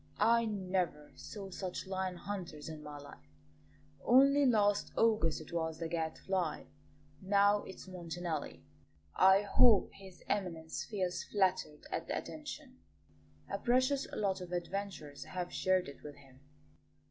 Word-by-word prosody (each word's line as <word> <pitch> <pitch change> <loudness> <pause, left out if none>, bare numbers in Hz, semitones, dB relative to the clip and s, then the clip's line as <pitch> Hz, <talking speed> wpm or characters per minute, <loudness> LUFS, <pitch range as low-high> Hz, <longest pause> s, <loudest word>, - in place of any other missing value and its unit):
I 230 +2 +4
never 185 -7 -2
saw 200 -3 -8
such 180 0 -4
lion 190 -1 -2
hunters 175 -6 -6
in 155 -1 -7
my 150 -1 -8
life. 80 - -14 0.7
Only 275 +3 +6
last 205 -4 +3
August 215 -8 +3
it 155 - -11
was 160 -1 -1
the 165 - -3
Gadfly; 165 +1 -2 0.6
now 200 +1 +4
it's 190 - -10
Montanelli. 170 - -5 0.5
I 190 +2 +6
hope 210 +1 +5
His 190 -2 -13
Eminence 165 -5 -2
feels 185 -5 -2
flattered 185 -7 0
at - - -3
the - - -1
attention; - - -7 0.7
a 200 - -3
precious 255 +4 +2
lot 195 -2 -1
of 180 -1 -7
adventurers 175 -6 -4
have 180 -1 -5
shared 185 -1 +2
it 140 - -10
with 145 -1 -8
him." 135 -2 -18
185 Hz, 135 wpm, -34 LUFS, 160-205 Hz, 0.7 s, Only